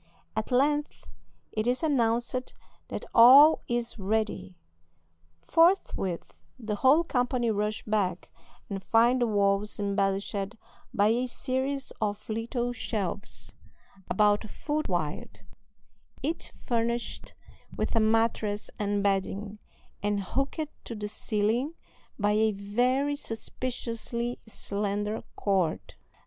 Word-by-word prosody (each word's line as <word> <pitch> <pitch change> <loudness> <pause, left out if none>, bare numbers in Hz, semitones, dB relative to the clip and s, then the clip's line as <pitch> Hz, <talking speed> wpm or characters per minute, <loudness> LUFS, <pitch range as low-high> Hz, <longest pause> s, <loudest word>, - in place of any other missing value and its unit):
At 220 0 -2
length 290 +4 +1 0.5
it 215 +1 -1
is 250 +5 +1
announced 245 -3 0 0.3
that - - -5
all 275 +7 +9
is 240 -1 -2
ready. 200 - -1 0.9
Forthwith 330 - +2 0.2
the 215 -4 -3
whole 275 +9 +5
company 245 -5 0
rush 210 +1 -1
back, 195 -5 -1 0.4
and 195 -1 -4
find 235 +5 +3
the 240 - +3
walls 200 0 +1
embellished 195 0 -1 0.4
by 210 -4 +3
a 245 +3 +1
series 265 +2 -2
of 205 -1 -2
little 235 +2 -2
shelves, 205 -4 -3 0.6
about 210 +2 +3
a - - -8
foot 300 +6 -3
wide, 170 -5 -3 0.8
each 320 +4 -2
furnished 235 0 -2 0.4
with - - -1
a - - +5
mattress 220 -1 +1
and 205 -1 0
bedding, 200 +1 -1 0.4
and 205 -1 0
hooked 275 - -1 0.2
to 230 - -6
the 210 -1 -4
ceiling 225 +9 -1 0.4
by 205 -1 +2
a 215 +1 +3
very 250 +8 +1
suspiciously 235 -1 -4
slender 205 0 -3
cord. 190 -5 0
220 Hz, 110 wpm, -28 LUFS, 205-250 Hz, 0.9 s, all